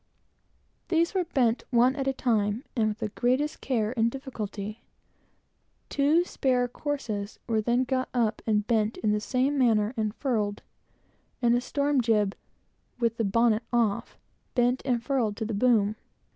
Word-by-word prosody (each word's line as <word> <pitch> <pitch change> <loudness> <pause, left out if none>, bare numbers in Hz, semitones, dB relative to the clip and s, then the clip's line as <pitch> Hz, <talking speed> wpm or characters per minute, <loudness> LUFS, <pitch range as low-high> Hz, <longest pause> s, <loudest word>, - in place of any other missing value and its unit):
These 335 +1 +1
were 370 -2 +1
done 250 -8 +2
one 250 +2 +4
at 270 -2 -3
a - - +3
time, 220 -2 0
and 225 -3 +2
with 215 -1 -2
the 220 -2 -3
greatest 255 +7 0
care 230 -4 0
and 230 -1 +2
difficulty. 215 -5 -6 1.1
Two 295 +5 +3
spare 250 -6 +1
courses 235 -7 -4
were 220 -2 +1
then 240 +3 +2
got 255 0 -1
up 230 -3 0
and 210 -2 +2
bent 220 -1 +1
in 215 - 0
the 210 - +1
same 260 +6 0
manner 220 -3 +3
and 215 -2 -2
furled, 215 -7 -1 0.8
and 240 -3 +3
a 245 - +2
storm 280 +1 +1
jib, 210 -4 +1 0.6
with 230 -2 0
the 230 - 0
bonnet 225 +2 +3
off, 230 -4 0 0.4
bent 245 0 +2
and 245 -3 0
furled 235 -6 0
to 220 - -2
the 220 - -3
boom. 215 -1 +3
235 Hz, 160 wpm, -27 LUFS, 215-260 Hz, 1.1 s, one